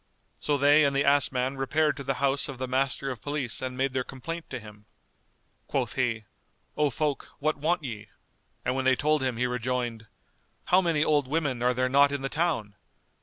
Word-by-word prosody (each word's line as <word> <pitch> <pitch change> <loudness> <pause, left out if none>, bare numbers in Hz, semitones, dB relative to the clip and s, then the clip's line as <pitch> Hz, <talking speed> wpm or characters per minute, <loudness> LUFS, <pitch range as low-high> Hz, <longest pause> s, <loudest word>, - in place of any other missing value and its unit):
So 145 -1 0
they 145 +2 +5
and 140 -1 +2
the 140 - +2
ass 140 0 +4
man 130 +1 -1
repaired 150 +3 +1
to 140 - -5
the 135 0 -1
house 140 +2 +1
of 135 - -6
the 130 +1 -3
master 135 +1 0
of 120 -4 -7
police 145 -5 -3
and 130 -1 -4
made 135 0 0
their 130 -1 0
complaint 165 +6 -7
to 130 - -4
him. 105 -1 -14 0.8
Quoth - - -1
he, 115 -4 -1 0.5
"O 150 -1 +2
folk, 145 +2 -2
what 155 +1 0
want 155 +3 0
ye?" 110 -5 -6 0.6
and 125 - +1
when 130 0 -2
they 130 0 +5
told 150 +2 +1
him 130 -3 -1
he 125 - +1
rejoined, 125 -2 -2 0.6
"How 185 +1 +4
many 165 -4 +2
old 145 -3 +2
women 140 -4 -1
are 125 0 +2
there 130 +1 +1
not 140 +2 +5
in 140 -1 -3
the 135 - -1
town! 145 -11 -1
135 Hz, 205 wpm, -27 LUFS, 125-145 Hz, 0.8 s, they